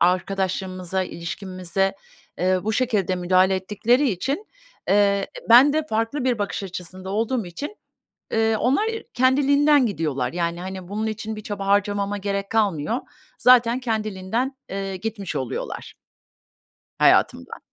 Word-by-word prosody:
arkadaşlığımıza, 185 Hz, 0 st, 0 dB
ilişkimize, 185 Hz, +1 st, -3 dB, 0.4 s
eee, 185 Hz, +1 st, +2 dB
bu 220 Hz, -, 0 dB
şekilde 215 Hz, -6 st, +1 dB
müdahale 185 Hz, +1 st, +3 dB
ettikleri 210 Hz, +8 st, +1 dB
için, 270 Hz, -, -2 dB, 0.4 s
eee, 200 Hz, 0 st, +3 dB, 0.2 s
ben 255 Hz, +5 st, +8 dB
de 310 Hz, 0 st, 0 dB
farklı 230 Hz, +3 st, -1 dB
bir 245 Hz, -3 st, +1 dB
bakış 205 Hz, +1 st, -2 dB
açısında 185 Hz, 0 st, -7 dB
olduğum 225 Hz, +1 st, -1 dB
için, 285 Hz, -, -7 dB, 0.6 s
eee, 225 Hz, 0 st, +2 dB
onlar 260 Hz, -, +2 dB, 0.3 s
kendiliğinden 280 Hz, +2 st, +4 dB
gidiyorlar. 150 Hz, -, -2 dB
Yani, 170 Hz, 0 st, -2 dB
hani, 185 Hz, -1 st, -7 dB
bunun 215 Hz, +3 st, -2 dB
için 220 Hz, 0 st, -4 dB
bir 215 Hz, -, -7 dB
çaba 200 Hz, -1 st, -5 dB
harcamama 205 Hz, 0 st, +1 dB
gerek 200 Hz, 0 st, -3 dB
kalmıyor. 210 Hz, -1 st, +1 dB, 0.4 s
Zaten 245 Hz, 0 st, +5 dB
kendiliğinden, 220 Hz, +2 st, -2 dB
eee, 195 Hz, 0 st, -3 dB
gitmiş 205 Hz, -1 st, -4 dB
oluyorlar. 130 Hz, -3 st, -5 dB, 1.0 s
Hayatımdan. -, -, +3 dB
200 Hz, 120 wpm, -23 LUFS, 185-230 Hz, 1.0 s, ben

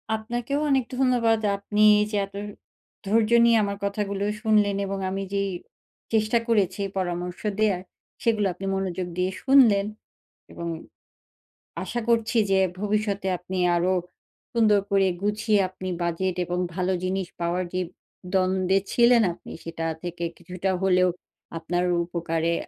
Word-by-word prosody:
আপনাকেও 240 Hz, +5 st, -3 dB
অনেক 265 Hz, -3 st, +2 dB
ধন্যবাদ। 245 Hz, -4 st, +3 dB, 0.2 s
আপনি 205 Hz, +1 st, -2 dB, 0.2 s
এই 210 Hz, -, +2 dB
যে 210 Hz, -, 0 dB
এত 200 Hz, 0 st, -17 dB, 0.7 s
ধৈর্য 215 Hz, +2 st, +2 dB, 0.2 s
নিয়ে 235 Hz, -1 st, +5 dB
আমার 200 Hz, 0 st, -2 dB
কথাগুলো 200 Hz, -1 st, -2 dB, 0.2 s
শুনলেন, 210 Hz, -3 st, +3 dB
এবং 195 Hz, 0 st, -3 dB
আমি 195 Hz, +1 st, -3 dB
যেই 200 Hz, 0 st, 0 dB, 0.6 s
চেষ্টা 220 Hz, +1 st, +3 dB
করেছি 200 Hz, -4 st, +1 dB, 0.2 s
পরামর্শ 180 Hz, -1 st, -3 dB, 0.2 s
দেয়ার, 205 Hz, -4 st, +2 dB, 0.4 s
সেগুলো 215 Hz, -3 st, +2 dB
আপনি 185 Hz, +3 st, -8 dB
মনোযোগ 185 Hz, -2 st, -2 dB
দিয়ে 180 Hz, +1 st, +1 dB
শুনলেন। 240 Hz, -8 st, +5 dB, 0.7 s
এবং 170 Hz, -, -6 dB, 1.2 s
আশা 240 Hz, -, -3 dB
করছি 230 Hz, 0 st, +2 dB
যে 190 Hz, -, +4 dB, 0.2 s
ভবিষ্যতে 205 Hz, -1 st, -1 dB
আপনি 185 Hz, +2 st, -6 dB, 0.2 s
আরো 180 Hz, +2 st, +2 dB, 0.6 s
সুন্দর 215 Hz, -3 st, +4 dB
করে 195 Hz, -1 st, +4 dB
গুছিয়ে 210 Hz, +1 st, +1 dB
আপনি 185 Hz, 0 st, -6 dB
বাজেট 175 Hz, +2 st, -1 dB
এবং 180 Hz, +1 st, -2 dB, 0.2 s
ভালো 185 Hz, 0 st, 0 dB
জিনিস 185 Hz, 0 st, -1 dB
পাওয়ার 175 Hz, +2 st, 0 dB
যে 185 Hz, -, 0 dB, 0.5 s
দ্বন্দ্বে 185 Hz, 0 st, +2 dB
ছিলেন 240 Hz, 0 st, +5 dB
আপনি -, -, -13 dB
সেটা 165 Hz, 0 st, -5 dB, 0.2 s
থেকে 175 Hz, 0 st, -5 dB
কিছুটা 180 Hz, +2 st, -4 dB
হলেও 185 Hz, -1 st, +4 dB, 0.5 s
আপনার 175 Hz, +2 st, -1 dB, 0.2 s
উপকারে 170 Hz, -1 st, -1 dB
195 Hz, 130 wpm, -25 LUFS, 180-215 Hz, 1.2 s, নিয়ে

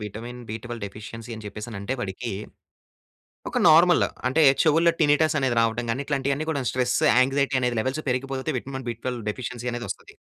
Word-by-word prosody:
Vitamin 120 Hz, +4 st, -8 dB, 0.4 s
deficiency 105 Hz, +3 st, -9 dB
అని 110 Hz, -, -10 dB
చెప్పేసి 105 Hz, +3 st, -7 dB
అంటే 120 Hz, +7 st, -2 dB
వాడికి, 110 Hz, +2 st, -4 dB, 1.2 s
ఒక -, -, 0 dB
నార్మల్ 170 Hz, +2 st, +6 dB, 0.2 s
అంటే 160 Hz, +5 st, +3 dB, 0.2 s
చెవులో 165 Hz, +2 st, +4 dB
టినిటస్ 155 Hz, +1 st, +3 dB
అనేది 130 Hz, -3 st, +1 dB
రావడం 115 Hz, +1 st, 0 dB
గాని. 130 Hz, +5 st, -1 dB
ఇట్లాంటివి 140 Hz, -1 st, 0 dB
అన్ని 155 Hz, +2 st, -4 dB
కూడా 140 Hz, -4 st, -1 dB
stress 125 Hz, -1 st, +1 dB, 0.2 s
anxiety 130 Hz, -1 st, +2 dB
levels 130 Hz, +6 st, -2 dB
పెరిగిపోతే 135 Hz, +3 st, -2 dB
vitamin B12 125 Hz, -2 st, -5 dB
deficiency 125 Hz, +1 st, -5 dB
అనేది 120 Hz, 0 st, -4 dB
వస్తది. -, -, -8 dB
125 Hz, 145 wpm, -25 LUFS, 120-140 Hz, 1.2 s, నార్మల్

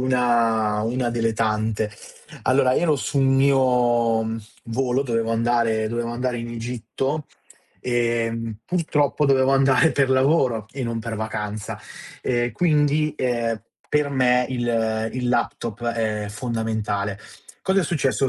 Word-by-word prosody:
una 115 Hz, -4 st, +2 dB
una 120 Hz, +2 st, -1 dB
delle 115 Hz, -1 st, 0 dB
tante. 110 Hz, -1 st, 0 dB, 0.5 s
Allora, 130 Hz, 0 st, +3 dB
io 130 Hz, -, +1 dB
ero 155 Hz, -4 st, +3 dB
sul 140 Hz, +1 st, 0 dB
mio, 125 Hz, -4 st, +3 dB
mhmm, 110 Hz, +1 st, -3 dB, 0.2 s
volo, 125 Hz, +2 st, 0 dB
dovevo 115 Hz, -3 st, -1 dB
andare 115 Hz, -1 st, +1 dB
dovevo 115 Hz, +1 st, -2 dB
andare 125 Hz, +1 st, -2 dB
in 115 Hz, 0 st, -5 dB
Egitto, 120 Hz, +5 st, -3 dB, 0.5 s
ehm, 115 Hz, -2 st, -1 dB
purtroppo 150 Hz, -3 st, +1 dB
dovevo 135 Hz, -1 st, +3 dB
andare 135 Hz, +4 st, +4 dB
per 135 Hz, -2 st, +2 dB
lavoro 130 Hz, -5 st, +2 dB
e 135 Hz, -, -4 dB
non 115 Hz, -1 st, -2 dB
per 115 Hz, 0 st, -4 dB
vacanza. 105 Hz, -1 st, -4 dB, 0.4 s
Ehm, 120 Hz, -1 st, 0 dB
quindi, 150 Hz, 0 st, +2 dB
ehm, 115 Hz, -3 st, -1 dB, 0.3 s
per 150 Hz, -1 st, +1 dB
me 125 Hz, -2 st, +3 dB
il 115 Hz, -3 st, 0 dB
il 125 Hz, -1 st, -2 dB
laptop 120 Hz, -2 st, -1 dB
è 110 Hz, -3 st, -1 dB
fondamentale. 110 Hz, -3 st, -2 dB, 0.4 s
Cosa 190 Hz, +1 st, +2 dB
è -, -, 0 dB
successo: 140 Hz, -4 st, +1 dB
120 Hz, 130 wpm, -23 LUFS, 115-135 Hz, 0.5 s, andare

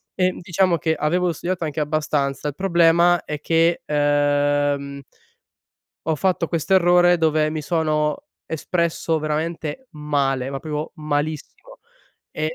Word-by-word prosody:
ehm, 185 Hz, -1 st, 0 dB
diciamo 175 Hz, -1 st, +1 dB
che 160 Hz, 0 st, 0 dB
avevo 175 Hz, +3 st, 0 dB
studiato 175 Hz, +2 st, -3 dB
anche 155 Hz, 0 st, -3 dB
abbastanza. 150 Hz, -2 st, -1 dB
Il 145 Hz, -, -4 dB
problema 170 Hz, -1 st, +3 dB
è 150 Hz, -1 st, -5 dB
che, 165 Hz, +2 st, +1 dB
uhm 145 Hz, -1 st, +1 dB, 1.1 s
ho 160 Hz, -1 st, +1 dB
fatto 180 Hz, -1 st, 0 dB
questo 165 Hz, +3 st, -1 dB
errore, 175 Hz, -1 st, +5 dB
dove 155 Hz, -1 st, +2 dB
mi 155 Hz, 0 st, -4 dB
sono 155 Hz, -, -1 dB, 0.2 s
espresso 165 Hz, 0 st, -1 dB
veramente 155 Hz, -, -3 dB
male, 140 Hz, -3 st, -1 dB
ma 135 Hz, -1 st, -5 dB
proprio 150 Hz, -1 st, -5 dB
malissimo 155 Hz, -, -4 dB, 0.5 s
e 155 Hz, +1 st, -3 dB
155 Hz, 125 wpm, -21 LUFS, 150-170 Hz, 1.1 s, errore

